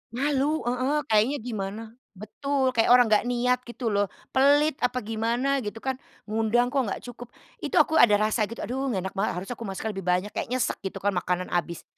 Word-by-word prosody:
Malu, 285 Hz, +2 st, 0 dB
heeh, 255 Hz, +5 st, 0 dB
kayaknya 220 Hz, +7 st, +3 dB
gimana. 215 Hz, -2 st, -4 dB, 0.3 s
Betul, 260 Hz, +6 st, -1 dB
kayak 225 Hz, 0 st, +2 dB
orang 245 Hz, -2 st, +6 dB
enggak 215 Hz, +3 st, +3 dB
niat, 250 Hz, +1 st, +1 dB
gitu 240 Hz, -2 st, -3 dB
loh, 200 Hz, 0 st, +2 dB, 0.3 s
pelit 290 Hz, +3 st, +4 dB
apa 250 Hz, -1 st, 0 dB
gimana, 235 Hz, +5 st, 0 dB
gitu 210 Hz, 0 st, -6 dB
kan. 265 Hz, -1 st, -2 dB, 0.3 s
Ngundang 225 Hz, +3 st, +1 dB
kok 275 Hz, -1 st, +2 dB
enggak -, -, -4 dB
cukup. 245 Hz, -1 st, -9 dB, 0.3 s
Itu -, -, -3 dB
aku 315 Hz, -, +4 dB
ada 210 Hz, -3 st, +7 dB
rasa 215 Hz, 0 st, +1 dB
gitu, 230 Hz, -, -7 dB
"Aduh, 265 Hz, +3 st, -2 dB
enggak 190 Hz, -4 st, -2 dB
enak -, -, -27 dB
banget. 200 Hz, +2 st, 0 dB
Harusnya 195 Hz, +7 st, -5 dB
aku 230 Hz, -, -5 dB
masak 205 Hz, +3 st, -4 dB
lebih 190 Hz, -2 st, -7 dB
banyak," 180 Hz, +4 st, +1 dB
kayak -, -, -3 dB
nyesek 255 Hz, -1 st, -1 dB
gitu 195 Hz, -, -5 dB
kan, 205 Hz, -, +2 dB
makanan 180 Hz, 0 st, -2 dB
habis. 170 Hz, -1 st, -2 dB
235 Hz, 200 wpm, -26 LUFS, 205-255 Hz, 0.3 s, ada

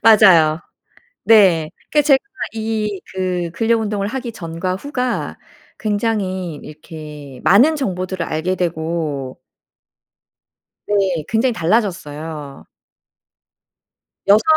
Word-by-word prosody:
맞아요. 180 Hz, -8 st, +6 dB, 0.6 s
네. 185 Hz, -8 st, +5 dB, 0.2 s
그러니까 300 Hz, -, +4 dB
제가 275 Hz, -2 st, +6 dB, 0.4 s
이 215 Hz, -3 st, -2 dB
그 180 Hz, -2 st, -1 dB
근력 225 Hz, +3 st, +1 dB
운동을 205 Hz, -2 st, -1 dB
하기 245 Hz, 0 st, -4 dB
전과 170 Hz, -1 st, -3 dB
후가 250 Hz, +1 st, -3 dB, 0.4 s
굉장히 205 Hz, -5 st, -1 dB
이렇게 150 Hz, -3 st, -10 dB
많은 260 Hz, -, +5 dB
정보들을 185 Hz, -, -2 dB
알게 160 Hz, +4 st, -1 dB
되고 160 Hz, -6 st, -3 dB, 1.4 s
네. 190 Hz, -6 st, 0 dB
굉장히 230 Hz, +3 st, +2 dB
달라졌어요. 160 Hz, -7 st, -2 dB, 1.6 s
6 210 Hz, +2 st, +6 dB
185 Hz, 200 characters per minute, -19 LUFS, 160-220 Hz, 1.6 s, 맞아요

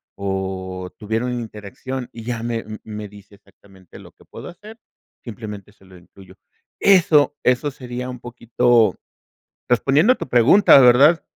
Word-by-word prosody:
o 95 Hz, -2 st, -5 dB
tuviera 110 Hz, +2 st, -3 dB
una 125 Hz, -, -3 dB
interacción 115 Hz, +4 st, -8 dB
y 115 Hz, -, -10 dB
ya 115 Hz, -1 st, -5 dB
me 115 Hz, -1 st, -3 dB, 0.2 s
me 105 Hz, -1 st, -8 dB
dice 100 Hz, 0 st, -17 dB
exactamente 95 Hz, -2 st, -20 dB
lo -, -, -15 dB
que -, -, -24 dB
puedo -, -, -11 dB
hacer, 210 Hz, +5 st, -14 dB, 0.5 s
simplemente 105 Hz, -3 st, -9 dB
se 95 Hz, -, -26 dB
lo 95 Hz, -1 st, -16 dB
incluyo. 95 Hz, +2 st, -18 dB, 0.4 s
Eso 165 Hz, -7 st, +4 dB
eso 125 Hz, +3 st, +1 dB
sería 125 Hz, -1 st, -7 dB
un 125 Hz, -, -10 dB
poquito, 120 Hz, -1 st, +1 dB, 0.8 s
respondiendo 140 Hz, -, +3 dB
a -, -, +3 dB
tu -, -, -7 dB
pregunta, 125 Hz, -, +5 dB
¿verdad? 135 Hz, +7 st, +5 dB
115 Hz, 150 wpm, -20 LUFS, 100-130 Hz, 0.8 s, pregunta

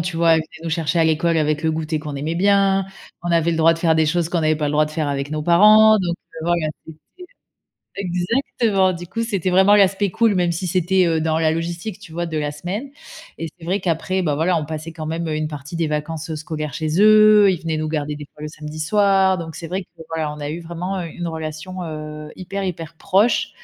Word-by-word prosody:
tu 165 Hz, 0 st, -3 dB
vois? 165 Hz, 0 st, +3 dB
Elle -, -, +3 dB
venait 160 Hz, +1 st, -8 dB
nous 165 Hz, -, -3 dB
chercher 165 Hz, 0 st, 0 dB
à 165 Hz, -, +4 dB
l'école 160 Hz, +1 st, +2 dB
avec 155 Hz, 0 st, 0 dB
le 160 Hz, -, +2 dB
goûter 155 Hz, 0 st, -2 dB
qu'on 150 Hz, -2 st, -6 dB
aimait 155 Hz, +4 st, -3 dB
bien. 195 Hz, +1 st, +3 dB, 0.4 s
On 175 Hz, -, -2 dB
avait 170 Hz, 0 st, +2 dB
le 165 Hz, -, -1 dB
droit 165 Hz, +1 st, +5 dB
de -, -, -8 dB
faire 165 Hz, -1 st, +2 dB
des 160 Hz, -1 st, +2 dB
choses 170 Hz, +1 st, 0 dB
qu'on 170 Hz, -, 0 dB
n'avait 155 Hz, 0 st, +2 dB
pas 150 Hz, -, -2 dB
le -, -, -2 dB
droit 150 Hz, +1 st, +3 dB
de 150 Hz, -, -9 dB
faire 155 Hz, -2 st, -2 dB
avec 140 Hz, +1 st, -3 dB
nos 155 Hz, 0 st, -3 dB
parents. 215 Hz, +6 st, +6 dB
Donc 175 Hz, -3 st, -2 dB, 0.2 s
heu, -, -, -8 dB
voilà, 170 Hz, -2 st, 0 dB, 0.2 s
c'était 160 Hz, -1 st, -11 dB, 1.0 s
exactement, 195 Hz, +1 st, 0 dB
du 175 Hz, -1 st, -7 dB
coup, 230 Hz, +6 st, -4 dB
c'était 195 Hz, -5 st, -1 dB
vraiment 190 Hz, +3 st, +5 dB
l'aspect 200 Hz, 0 st, +3 dB
cool, 225 Hz, +2 st, +2 dB
même 175 Hz, -1 st, +1 dB
si 170 Hz, +2 st, -3 dB
c'était, 185 Hz, +1 st, +2 dB
heu, 160 Hz, -1 st, +1 dB
dans 160 Hz, 0 st, 0 dB
la 160 Hz, -1 st, +2 dB
logistique, 170 Hz, +5 st, -4 dB
tu 165 Hz, -, -13 dB
vois, 170 Hz, +2 st, -3 dB
de 160 Hz, -2 st, -4 dB
la 145 Hz, -1 st, -2 dB
semaine. 180 Hz, -, -5 dB, 0.5 s
Et 165 Hz, -, -4 dB
c'est 165 Hz, -, -11 dB
vrai 190 Hz, +4 st, 0 dB
qu'après, 185 Hz, +2 st, -1 dB
bah, 150 Hz, -4 st, 0 dB
voilà, 170 Hz, +4 st, +1 dB
on 155 Hz, -, -3 dB
passait 155 Hz, +1 st, -6 dB
quand 160 Hz, -1 st, -7 dB
même, 165 Hz, +1 st, -3 dB
heu, 155 Hz, -, -2 dB
une 155 Hz, 0 st, -1 dB
partie 150 Hz, +1 st, -8 dB
des 165 Hz, 0 st, 0 dB
vacances, 150 Hz, +1 st, -3 dB
heu, -, -, -3 dB
scolaire 155 Hz, -2 st, -5 dB
chez 155 Hz, +5 st, -1 dB
eux. 215 Hz, -1 st, +7 dB
Ils 175 Hz, -, -3 dB
venaient 160 Hz, -2 st, -2 dB
nous 155 Hz, 0 st, -2 dB
garder 150 Hz, -1 st, -2 dB
des 150 Hz, -, -8 dB
fois 150 Hz, -, -15 dB
le 150 Hz, -, -4 dB
samedi 155 Hz, 0 st, -9 dB
soir. 190 Hz, +2 st, +3 dB
Donc 160 Hz, -2 st, -7 dB
c'est 165 Hz, -, -7 dB
vrai 185 Hz, +3 st, -3 dB
que -, -, -30 dB, 0.2 s
voilà, 155 Hz, -2 st, -2 dB
on 150 Hz, -, -10 dB
a 145 Hz, 0 st, -4 dB
eu 165 Hz, +3 st, -4 dB
vraiment, 175 Hz, +3 st, -4 dB
heu, 170 Hz, -, -5 dB
une 175 Hz, +1 st, -6 dB
relation, 160 Hz, +3 st, -6 dB
heu, 155 Hz, -1 st, -7 dB
hyper, 195 Hz, +2 st, -5 dB
hyper 165 Hz, -2 st, -5 dB
proche 200 Hz, +8 st, +2 dB
165 Hz, 250 wpm, -21 LUFS, 155-185 Hz, 1.0 s, eux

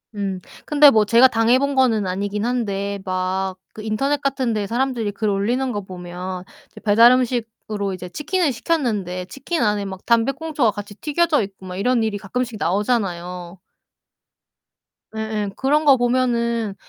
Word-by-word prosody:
음. 195 Hz, -2 st, -3 dB, 0.3 s
근데 295 Hz, -1 st, +7 dB
뭐 220 Hz, -5 st, +3 dB
제가 235 Hz, +5 st, +6 dB
당해 230 Hz, +1 st, +3 dB
본 280 Hz, 0 st, -1 dB
거는 230 Hz, -7 st, +2 dB
아니긴 205 Hz, +3 st, -2 dB
한데 200 Hz, -5 st, -2 dB
막 185 Hz, 0 st, -2 dB, 0.2 s
그 215 Hz, -, -7 dB
인터넷 270 Hz, +7 st, 0 dB
같은 265 Hz, -4 st, 0 dB
데 210 Hz, -2 st, -1 dB
사람들이 235 Hz, -1 st, -1 dB
글 215 Hz, +1 st, -2 dB
올리는 240 Hz, +7 st, 0 dB
거 205 Hz, -, -3 dB
보면 180 Hz, 0 st, -7 dB, 0.3 s
이제 -, -, -13 dB
배달 225 Hz, +3 st, +6 dB
음식으로 225 Hz, -5 st, -1 dB
이제 180 Hz, -1 st, -7 dB
치킨을 305 Hz, -, 0 dB
시켰는데 220 Hz, -, -2 dB
치킨 280 Hz, -, -4 dB
안에 210 Hz, -2 st, +1 dB
막 190 Hz, -1 st, -7 dB
담배꽁초가 270 Hz, +2 st, +1 dB
같이 205 Hz, 0 st, -8 dB
튀겨져 305 Hz, +2 st, +1 dB
있고 195 Hz, -1 st, -10 dB
막 180 Hz, -, -6 dB
이런 245 Hz, +4 st, +1 dB
일이 220 Hz, -2 st, -1 dB
가끔씩 225 Hz, +3 st, -4 dB
나오잖아요. 180 Hz, -3 st, -2 dB, 1.6 s
예예. 220 Hz, -2 st, -2 dB
그런 295 Hz, +3 st, +1 dB
거 280 Hz, -, +7 dB
보면은 235 Hz, -3 st, 0 dB
220 Hz, 320 characters per minute, -21 LUFS, 195-255 Hz, 1.6 s, 근데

